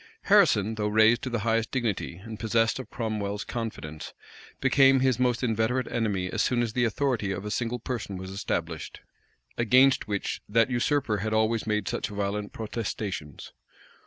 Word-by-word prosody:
Harrison, 105 +2 +4
though 105 -1 -1
raised 110 +3 +4
to 130 - -3
the 120 -3 -2
highest 115 +1 +1
dignity, 115 -9 -2
and 110 +4 -9
possessed 115 +2 +1
of 130 - -8
Cromwell's 105 -3 -3
confidence, 110 -10 -6 0.4
became 135 0 +5
his 130 -3 +2
most 125 -1 +1
inveterate 115 +2 +1
enemy 100 -6 -1
as - - 0
soon 120 -1 +1
as 115 -2 -3
the 120 0 +2
authority 115 -3 0
of 95 +1 -4
a 105 - -4
single 120 +2 -1
person 115 -5 -5
was 95 +1 -7
established, 85 -4 -4 0.6
against 130 +2 +4
which 100 -1 -3
that 115 +3 +3
usurper 125 -2 +1
had 110 +2 -2
always 110 0 +1
made 105 -2 0
such - - -2
violent 105 0 -3
protestations. 100 - -5
110 Hz, 160 wpm, -27 LUFS, 105-120 Hz, 0.6 s, became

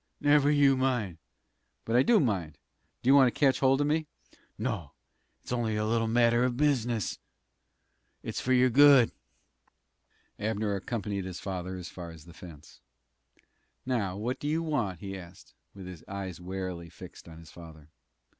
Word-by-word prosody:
"Never 145 0 +4
you 145 -2 +4
mind." 120 -10 -1 0.7
"But 115 - -1
I 125 - +6
do 225 - +4
mind. 95 - -1 0.5
Do - - -4
you 135 - +7
want 135 -2 +7
to - - -14
catch 135 -3 +3
hold 135 +1 +3
of - - +2
me?" 155 +1 0 0.5
"No; 105 - -4 0.5
it's - - -9
only 115 -3 -1
a 105 0 -1
little 115 +1 +1
matter 120 +1 +3
of 125 -1 0
business. 120 -7 0 1.0
It's - - -4
for 130 - -2
your 125 0 +4
good." 140 -2 +7 1.3
Abner 105 -1 -1
accompanied 100 -1 -4
his 95 -2 -6
father 95 -1 -5
as 90 -1 -7
far 85 -2 -8
as 80 -2 -13
the 85 - -14
fence. 80 -3 -13 1.0
"Now, 105 -8 -1
what 120 +5 -3
do 145 - -4
you 160 +2 0
want?" 115 - -2
he 95 -1 -6
asked, 90 -1 -12 0.2
with 95 -2 -9
his 90 -3 -10
eyes 95 -3 -6
warily 90 -2 -5
fixed 90 0 -13
on 80 - -12
his 80 -1 -14
father. 80 -3 -13
110 Hz, 165 wpm, -29 LUFS, 90-130 Hz, 1.3 s, you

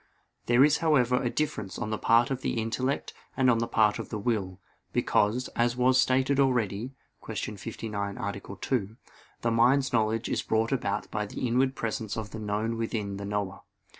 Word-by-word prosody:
There 120 +2 +6
is 150 0 +3
however 125 -6 +3
a 120 - 0
difference 110 -10 -2
on 110 -2 -3
the 110 - 0
part 115 +3 +4
of 130 -1 -2
the 115 - -1
intellect 125 +5 -2 0.2
and 130 -2 +5
on 115 - +2
the 115 - -1
part 105 -2 +3
of - - -6
the 110 - -3
will. 100 -4 -2 0.3
Because, 115 +5 +2
as 120 +1 0
was 130 +1 +4
stated 130 +2 +2
already 125 -2 +1 0.3
(Q. 105 - -4
59, 100 -1 -5
A. 100 0 -3
2), 105 +2 -3 0.4
the 115 - +1
mind's 130 +4 +3
knowledge 110 0 +1
is - - 0
brought 110 +2 0
about 105 -6 -1
by 105 -1 -2
the 125 - -4
inward 130 +3 +2
presence 110 -1 -3
of 110 -2 -5
the 110 - -6
known 110 +2 -2
within 105 -3 -3
the 100 - -5
knower. 100 -2 -3
115 Hz, 185 wpm, -28 LUFS, 105-125 Hz, 0.4 s, There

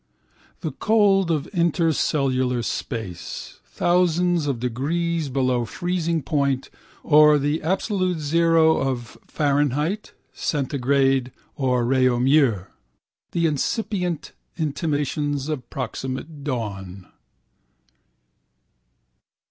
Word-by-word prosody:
The 160 - -3
cold 195 +2 +3
of 155 -4 0
interstellar 145 - +1
space, 110 -11 -5
thousands 175 -2 +1
of 135 -4 -1
degrees 155 +6 -1
below 130 -2 +1
freezing 170 +3 -2
point 140 -2 0 0.3
or 150 0 +6
the 145 +2 0
absolute 185 +1 0
zero 160 +1 +3
of 125 -3 -3
Fahrenheit, 145 - 0 0.2
Centigrade 135 -2 +1 0.2
or 125 -4 +1
Réaumur: 130 -3 +3 0.7
the 170 -1 +1
incipient 180 - -1 0.3
intimations 145 -2 -1
of 150 -5 -4
proximate 135 +3 -5
dawn. 100 -8 -4
145 Hz, 80 wpm, -23 LUFS, 130-165 Hz, 0.7 s, or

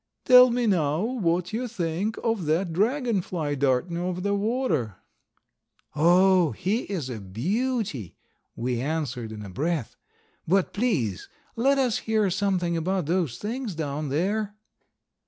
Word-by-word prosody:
"Tell 250 0 +8
me 240 0 0
now 160 -6 +1
what 180 -7 -1
you 245 +3 -2
think 190 0 -2
of 225 -8 -1
that 165 +2 +1
Dragon 230 - +1
fly 160 -5 -3
darting 140 +5 0
over 180 +1 -2
the 200 +2 0
water?" 200 - 0 1.0
"Oh, 175 0 +4
he 205 - -1
is 180 -9 -3
a 120 -4 -5
beauty," 155 - -2 0.4
we 120 0 -2
answered 130 -6 -3
in 105 -1 -7
a - - -8
breath. 150 - -2 0.5
"But 190 +2 +2
please 170 - -1 0.3
let 270 +4 +3
us 255 -4 +1
hear 215 -3 +2
something 185 -3 0
about 180 +1 -1
those 165 -7 0
things 225 -2 -4
down 150 -1 -3
there." 205 +8 -1
180 Hz, 135 wpm, -26 LUFS, 150-215 Hz, 1.0 s, Tell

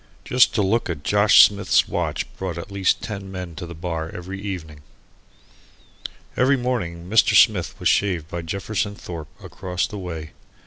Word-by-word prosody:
Just 125 0 +4
to 105 - +2
look 105 +2 +1
at 75 -4 -4
Josh 105 0 +6
Smith's 100 -1 +2
watch - - -2
brought 90 -3 -4
at 85 +4 -7
least 100 -2 +1
ten 100 -2 -6
men 90 -3 -6
to 85 0 -7
the 85 - -9
bar 80 -1 -4
every 95 +3 -7
evening. 80 -7 -6 1.5
Every 135 +2 +3
morning 90 -10 -3
Mr. 110 +3 +4
Smith - - +4
was - - 0
shaved 90 -6 +1
by 85 +1 -5
Jefferson 100 +4 -3
Thorpe, 85 -5 -8
across 90 -2 -3
the 105 - -7
way. 80 -4 -6
95 Hz, 165 wpm, -22 LUFS, 85-100 Hz, 1.5 s, Josh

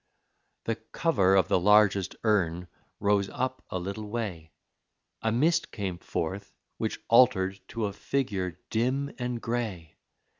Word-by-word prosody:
The - - -1
cover 100 - +2
of 95 -4 +4
the - - +3
largest 100 -1 +4
urn 90 -5 +1 0.3
rose 100 -1 +2
up 130 0 -3
a - - -2
little 100 +4 -5
way, 95 -8 -4 0.7
A 110 - +1
mist 160 +8 +2
came 95 -4 -4
forth, 95 +6 -4 0.2
which - - -2
altered 105 -6 +4
to 115 -2 -2
a 100 - -3
figure 100 -7 -2
dim 130 +5 0
and 125 -1 -2
gray. 110 -10 -4
105 Hz, 135 wpm, -28 LUFS, 95-120 Hz, 0.7 s, of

